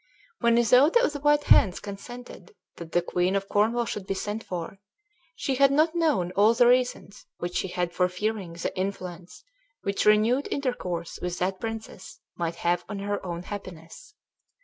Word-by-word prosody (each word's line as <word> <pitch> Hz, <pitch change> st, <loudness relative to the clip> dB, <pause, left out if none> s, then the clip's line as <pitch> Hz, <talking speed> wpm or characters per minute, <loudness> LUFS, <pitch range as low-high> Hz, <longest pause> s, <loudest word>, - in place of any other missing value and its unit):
When 235 Hz, -1 st, +3 dB
Isoude 250 Hz, -, +5 dB
of 300 Hz, -, +1 dB
the 290 Hz, -, -5 dB
White 295 Hz, +1 st, +3 dB
Hands 185 Hz, -3 st, +5 dB
consented 245 Hz, -, -10 dB, 0.2 s
that 165 Hz, -1 st, -9 dB
the 175 Hz, -, +2 dB
queen 180 Hz, +2 st, 0 dB
of 195 Hz, 0 st, -1 dB
Cornwall 225 Hz, +4 st, +2 dB
should 200 Hz, -3 st, -5 dB
be 195 Hz, -, -1 dB
sent 210 Hz, +3 st, -4 dB
for, 180 Hz, +2 st, -6 dB, 0.6 s
she 275 Hz, -, -2 dB
had 275 Hz, +1 st, +4 dB
not 310 Hz, +3 st, +3 dB
known 305 Hz, -, +1 dB
all 210 Hz, +4 st, +4 dB
the 245 Hz, -, +5 dB
reasons 245 Hz, -5 st, +1 dB
which 175 Hz, 0 st, -3 dB
she -, -, -1 dB
had 175 Hz, -1 st, -2 dB
for 180 Hz, 0 st, +2 dB
fearing 195 Hz, -1 st, -3 dB
the 170 Hz, +2 st, -4 dB
influence 185 Hz, -2 st, -5 dB, 0.4 s
which 200 Hz, 0 st, -1 dB
renewed 220 Hz, +6 st, +4 dB
intercourse 180 Hz, -, -3 dB
with 180 Hz, 0 st, -3 dB
that 185 Hz, +1 st, -1 dB
princess 225 Hz, -1 st, -7 dB, 0.2 s
might 170 Hz, -1 st, -3 dB
have 175 Hz, +1 st, 0 dB
on 205 Hz, -, -4 dB
her 205 Hz, +1 st, -3 dB
own 175 Hz, -1 st, -5 dB
happiness. 195 Hz, -, -9 dB
200 Hz, 170 wpm, -26 LUFS, 180-245 Hz, 0.6 s, Isoude